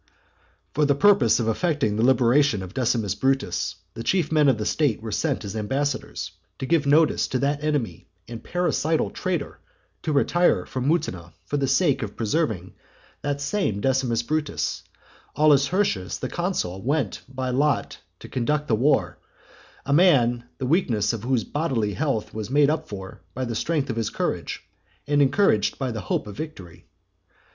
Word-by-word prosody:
II. - - -37
For 150 0 +2
the 140 -1 +3
purpose 145 - +4
of 115 - -1
effecting 140 - 0
the 110 - 0
liberation 130 -2 +3
of 95 +1 -9
Decimus 115 -6 0
Brutus, 135 +5 0 0.2
the 115 - -7
chief 170 +4 0
men 150 -3 +4
of 130 - +2
the 105 - -3
state 145 -8 +1
were 110 0 -6
sent 140 -2 -1
as 100 +1 -6
ambassadors, 135 +6 -2 0.3
to - - -4
give 155 0 +2
notice 155 +2 +4
to 130 - -1
that 145 +2 -1
enemy 140 - -2 0.2
and 115 -1 -8
parricidal 165 -3 0
traitor 175 -6 -3 0.4
to 155 - -2
retire 145 - +2
from 130 0 -3
Mutina; 90 - -1
for 145 - -2
the 140 -1 0
sake 140 0 +2
of 105 -3 -5
preserving 110 - -1 0.5
that 145 0 -2
same 145 - -1
Decimus 125 -1 +1
Brutus, 155 +3 -2 0.5
Aulus 145 -2 +4
Hirtius, 175 - 0
the 130 - -4
consul, 170 - -2
went 135 -3 -1
by 130 -1 -3
lot 140 +1 0 0.2
to - - -9
conduct 150 +4 -1
the - - +2
war, 110 - +1 0.7
a 140 - 0
man 125 -8 +4
the 130 - -3
weakness 125 - +1
of 115 - -4
whose 125 -3 +1
bodily 130 -9 -1
health 135 -5 -2
was 110 0 -5
made 145 +2 +4
up 155 - -3
for 95 -2 -8
by 130 - -2
the 120 - -3
strength 145 +3 -1
of 115 - -5
his 115 -2 -1
courage, - - -3 0.4
and 145 0 +2
encouraged 135 - +3
by 130 -2 -2
the 110 -2 -4
hope 90 - -2
of 105 -2 -8
victory. 95 - -9
135 Hz, 170 wpm, -24 LUFS, 110-150 Hz, 0.7 s, purpose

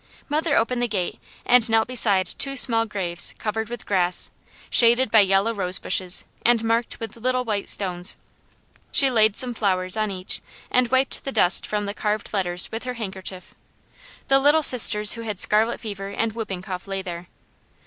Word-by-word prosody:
Mother 305 +1 0
opened 245 +1 -1
the 245 - 0
gate 190 -5 -4 0.3
and 245 -1 +3
knelt 225 0 +2
beside 205 -6 0
two 275 +9 0
small 230 -3 +3
graves 175 -4 -4
covered 220 0 -4
with 240 -1 -8
grass, 180 -2 +3 0.4
shaded 240 0 +4
by 220 - +5
yellow 195 +3 +2
rose 185 -3 +2
bushes, 185 0 -2 0.2
and 235 -1 +2
marked 230 +1 -2
with 225 -1 -8
little 255 +2 -2
white 205 -3 -3
stones. 180 -1 -1 0.7
She 275 -2 +5
laid 220 -3 +2
some 250 0 +1
flowers 185 -4 0
on 215 -1 -2
each 185 -1 -4 0.3
and 250 0 +2
wiped 260 +2 0
the 275 - -5
dust 180 -7 +2
from 210 -1 -3
the 200 - -5
carved 210 0 -4
letters 180 -3 +1
with 225 - -6
her 250 0 -5
handkerchief. 190 -4 -6 0.7
The 270 0 +3
little 295 +3 +3
sisters 210 -5 +7
who 230 - -8
had 210 -4 -6
scarlet 220 +3 +1
fever 200 -3 -7
and 220 +2 -3
whooping 200 -5 -6
cough 185 -1 -8
lay 195 -1 -5
there. 175 -1 -8
215 Hz, 180 wpm, -22 LUFS, 190-240 Hz, 0.7 s, sisters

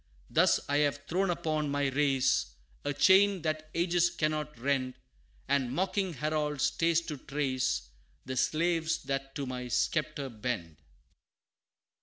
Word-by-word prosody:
Thus - - +4
I 145 - +1
have 145 -1 +1
thrown 190 +3 +1
upon 155 -3 -1
my 140 -1 +1
race, 135 - +1 0.3
A 145 - -1
chain 190 +5 +5
that 155 -1 -2
ages 175 0 +3
cannot 155 -4 -2
rend 130 0 -1 0.5
And 135 -3 +1
mocking 190 +3 0
Harold 150 0 -1
stays 165 +3 +2
to 155 -3 -6
trace, 130 - -1 0.4
The 130 - -4
slaves 160 +3 +1
that 135 0 -3
to 140 - -3
my 125 -1 -5
sceptre 150 +3 -1
bend." 105 - -4
145 Hz, 130 wpm, -30 LUFS, 135-160 Hz, 0.5 s, chain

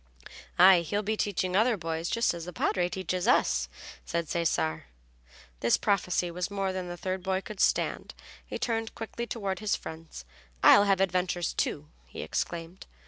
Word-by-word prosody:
"Aye, 185 0 +8
he'll 205 +5 -2
be 215 +2 0
teaching 185 -3 -1
other 220 +2 +3
boys 165 -1 -3
just 230 -4 +1
as 170 -1 -6
the 180 - -7
Padre 175 +1 0
teaches 185 0 -2
us," - - +3 0.3
said 170 -1 -2
Cesare. 80 - -1 0.7
This 115 - +3
prophecy 180 -3 0
was 180 +2 -3
more 195 -2 -2
than 185 -1 -4
the 175 0 -6
third 185 +1 -3
boy 190 +1 -1
could 210 0 -9
stand. - - +1 0.3
He - - -6
turned 225 -1 -2
quickly 235 +1 -5
toward 195 -6 -3
his 215 -1 0
friends. 160 - -9 0.4
"I'll 205 - +8
have 195 -1 +2
adventures, 180 -2 0
too," 150 +1 -2 0.2
he - - -7
exclaimed. 170 +2 -4
185 Hz, 165 wpm, -29 LUFS, 170-200 Hz, 0.7 s, Aye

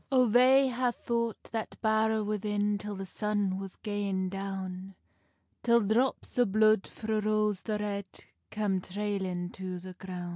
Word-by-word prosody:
O 255 -2 +5
they 255 +4 +6
hae 250 0 +1
fought 235 -2 -2
that 225 -1 -4
bowr 220 0 +2
within 210 0 0
Till 210 0 -5
the 195 0 -5
sun 205 -1 -1
was 195 -1 -7
gaing 200 -3 -1
down, 195 -1 -5 0.7
Till 235 0 +4
drops 235 +5 0
o 245 - +6
blude 215 0 +4
frae 220 -1 -2
Rose 210 -2 +1
the 215 -2 -2
Red 200 -2 -3 0.4
Cam 205 -3 0
trailing 190 -2 -3
to 185 -1 -5
the 185 +1 -9
groun. 180 -1 -6
210 Hz, 150 wpm, -30 LUFS, 190-220 Hz, 0.7 s, they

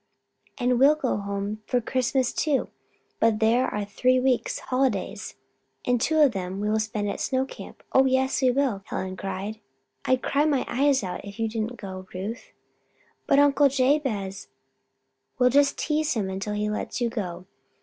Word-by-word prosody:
"And 245 -1 +1
we'll 285 +3 +6
go 270 -8 -1
home 200 +1 -4
for 250 - +2
Christmas, 255 +1 0
too; 290 -4 0 0.5
but 225 -1 +3
there 230 +3 +3
are 210 -1 -3
three 255 +5 +2
weeks' 255 -1 +1
holidays, 255 -7 -2 0.5
and 245 -2 +1
two 315 +4 +1
of 285 -4 +6
them 190 -2 -4
we 210 +1 0
will 220 - +2
spend 215 -1 -2
at 200 - -3
Snow 260 0 0
Camp. - - -11
Oh, 265 - +6
yes 265 +1 +1
we 260 - +4
will!" 250 -6 +1
Helen 185 0 -4
cried. 195 +3 -5 0.5
"I'd 255 0 +2
cry 290 +2 +2
my 285 -4 +1
eyes 270 0 +2
out 180 -2 -5
if 200 0 -9
you 225 - +1
didn't 225 +2 -3
go, 185 -2 -8
Ruth." 205 +6 -6 0.8
"But 275 - +4
Uncle 285 0 +5
Jabez 255 -8 0 0.5
" - - -51
"We'll 250 0 +4
just 280 +1 +3
tease 310 -1 0
him 195 -4 -1
until 195 +2 -3
he 210 0 -1
lets 210 +4 -3
you 240 -2 0
go. 180 -6 -5
240 Hz, 175 wpm, -25 LUFS, 205-265 Hz, 0.8 s, we'll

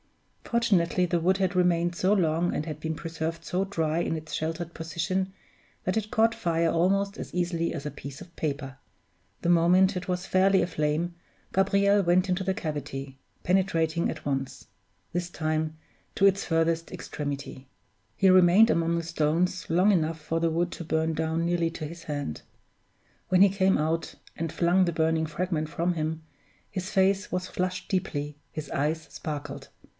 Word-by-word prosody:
Fortunately 190 -7 +2
the 175 0 0
wood 185 +3 +2
had 190 -1 0
remained 175 -1 +2
so 185 +3 +1
long 175 -3 +2
and 150 - -2
had 155 -2 -6
been 160 0 -2
preserved 165 0 -4
so 185 +1 0
dry 165 -5 -1
in 165 -1 -1
its 155 0 -9
sheltered 165 +2 -3
position, 175 +4 -2 0.5
that 185 - 0
it 215 -1 -2
caught 225 +1 +3
fire 165 -1 +1
almost 195 +5 +1
as - - -7
easily 175 -1 0
as 145 -3 -6
a 150 - -3
piece 140 0 -9
of 170 - -13
paper. 140 -3 -3 0.7
The - - 0
moment 180 +3 +4
it 180 +1 -5
was 180 +1 -1
fairly 190 +1 +4
aflame 160 +1 -1 0.4
Gabriel 200 +1 +3
went 180 +1 +3
into 185 +1 0
the 190 0 0
cavity, 145 -6 -5 0.3
penetrating 170 -3 +1
at 160 - -6
once 135 -2 -3 0.5
this 175 0 -2
time 155 -1 -2 0.4
to 195 - +3
its 195 0 +4
furthest 165 0 0
extremity. 140 -2 -6 0.5
He 195 - +5
remained 185 +4 +7
among 170 -4 +2
the 170 - -2
stones 165 +3 0
long 180 +5 +4
enough 165 -3 +1
for 165 +2 -2
the 165 - +3
wood 170 +2 0
to - - -6
burn 160 0 0
down 160 +1 -1
nearly 170 -1 +1
to 165 -1 -6
his 165 +2 -9
hand. 145 - -4 0.9
When 185 0 +4
he 200 - +8
came 190 0 +2
out, 160 +2 -1 0.2
and 165 -1 -3
flung 175 +3 +3
the 175 - +1
burning 160 0 +1
fragment 160 -1 -2
from 170 +3 0
him, 160 0 -3 0.5
his 185 -1 -4
face 195 -1 +2
was 180 0 -2
flushed 185 0 -3
deeply, 150 -6 -2 0.2
his 155 - -6
eyes 155 +3 0
sparkled. 145 -2 -6
170 Hz, 170 wpm, -27 LUFS, 160-185 Hz, 0.9 s, he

